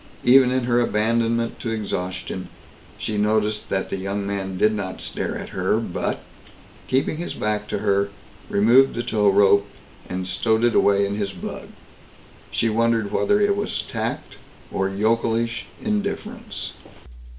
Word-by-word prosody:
Even 130 +1 +7
in 130 0 +1
her 120 0 +2
abandonment 115 +1 +1
to 115 - -3
exhaustion 95 -4 -3 0.5
she 105 -1 -2
noticed 105 0 +1
that 95 - -1
the - - -1
young 100 +1 -3
man 95 -2 -3
did 105 +3 +3
not 100 -3 -4
stare - - -3
at - - -7
her - - 0
but, - - -3 0.6
keeping 135 +4 +1
his 175 - -4
back 105 0 -1
to - - -2
her, 100 0 +1 0.4
removed 120 +6 +5
the 120 - -2
tow 105 -4 +2
rope, 100 0 +5 0.4
and 90 0 -3
stowed 110 +5 +1
it 120 -1 +4
away 100 0 +4
in 100 - -2
his 100 -2 -2
bug. 90 - -7 0.8
She 115 - +1
wondered 115 -1 +1
whether 205 - +2
it 205 -1 +3
was 205 +1 -2
tact - - -4 0.3
or 95 0 0
yokelish 115 +3 0
indifference. 215 +2 -3
110 Hz, 150 wpm, -23 LUFS, 100-120 Hz, 0.8 s, Even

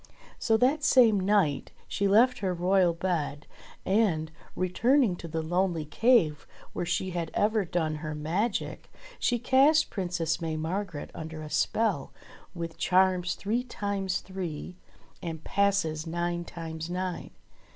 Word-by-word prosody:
So 225 -1 +3
that 275 +6 +2
same 230 -8 +5
night 190 -7 +1 0.2
she 200 - 0
left 240 +6 +4
her 185 -2 -1
royal 180 0 +3
bed, 165 -4 -2 0.4
and, 190 -7 +1 0.2
returning 230 +4 +2
to 170 - -8
the 160 0 -3
lonely 175 -1 0
cave 165 - +2 0.3
where 175 - -3
she 185 +2 -1
had 170 -2 -3
ever 210 -1 +2
done 160 -3 -1
her 155 0 -5
magic, 180 +9 -2 0.3
she 245 - +1
cast 270 +6 +4
Princess 175 -4 -2
May 160 -1 -2
Margret 170 0 -4
under 160 -1 -7
a 150 - -8
spell 210 -11 0 0.4
with 165 -1 -6
charms 185 -1 +2
three 225 +5 -1
times 200 -6 -2
three, 180 -3 -6 0.5
and 160 -2 -6
passes 190 -6 0
nine 175 +1 -2
times 160 -1 -6
nine. 180 0 -3
180 Hz, 135 wpm, -28 LUFS, 160-205 Hz, 0.5 s, same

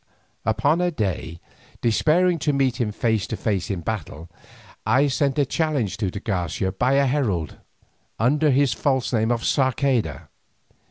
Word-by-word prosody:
Upon 145 - +2
a 180 - +2
day, 95 - -3 0.4
despairing 165 +9 +2
of 145 - +3
meeting 130 -3 +1
him - - -3
face 110 -2 0
to 110 - -4
face 100 -5 -1
in 95 -4 -2
battle, 85 -5 -5 0.5
I 130 +6 +3
sent 135 +2 0
a 145 - +3
challenge 145 - -1
to 105 -4 -1
de 100 - -6
Garcia 95 -2 -2
by 125 +7 +1
a 140 0 +4
herald, 120 - -1 0.6
under 145 +7 +2
his 135 -2 +3
false 130 +1 0
name 110 -1 +2
of 120 -1 0
Sarceda. 130 - 0
120 Hz, 155 wpm, -23 LUFS, 100-140 Hz, 0.6 s, a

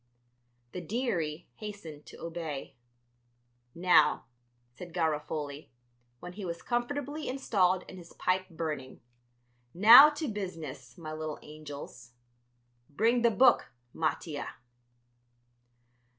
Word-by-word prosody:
The 180 - -6
"dearie" 170 -6 -2
hastened 200 -9 -9
to - - -12
obey. 165 -4 -6 1.0
"Now," 180 +1 +4 0.5
said 175 +3 -10
Garofoli, 150 -3 -2 0.5
when 180 0 -9
he 205 +2 -8
was 170 -2 -5
comfortably 285 +5 -3
installed 190 -8 +1
and 185 - -10
his 170 -1 -14
pipe 185 +1 -1
burning; 155 -7 -5 0.7
"now 230 - +10
to 300 +1 -4
business, 180 - -6
my 155 -2 -7
little 155 -1 -5
angels. 145 -5 -10 0.8
Bring 230 +10 +2
the 235 - +5
book, 245 +3 +4 0.2
Mattia." 155 -1 -3
175 Hz, 100 wpm, -30 LUFS, 155-215 Hz, 1.0 s, now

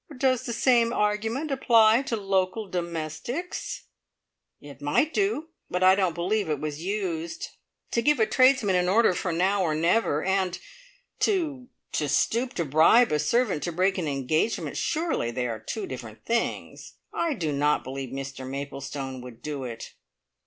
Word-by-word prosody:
"Does 255 -2 +1
the - - -2
same 235 -1 +3
argument 225 +8 -1
apply 230 -3 +5
to 230 - 0
local 195 +1 0
domestics?" 175 - -4 0.8
"It 145 -1 -13
might 150 - +1
do; 390 -6 0 0.2
but 180 +1 -1
I 185 0 +8
don't 190 -4 +1
believe 185 +2 0
it 150 -2 -1
was 150 0 -4
used. 180 -4 -3 0.4
To 235 - +1
give 295 +2 +3
a 220 - +5
tradesman 255 -6 +4
an 180 0 +2
order 220 0 +4
for 180 0 -2
now 190 +4 +1
or 160 -4 +1
never, 165 -1 +2
and 190 -1 0 0.6
to 310 -11 0 0.2
to 150 -2 -1
stoop 245 - +1
to 170 - -1
bribe 160 - +5
a 150 - +2
servant 235 - +1
to 175 - -2
break 185 +3 +1
an 165 - -2
engagement 145 - -1
surely 320 - -1
they 125 +1 -2
are 115 -2 -3
two 200 - -5
different 120 - -9
things! 235 0 -2 0.2
I 330 -4 0
do 160 -8 -2
not 145 +1 +1
believe 135 0 -5
Mr 135 0 -6
Maplestone 135 -1 -5
would 125 -2 -12
do 145 -3 -4
it!" 115 -2 -7
185 Hz, 160 wpm, -26 LUFS, 145-230 Hz, 0.8 s, I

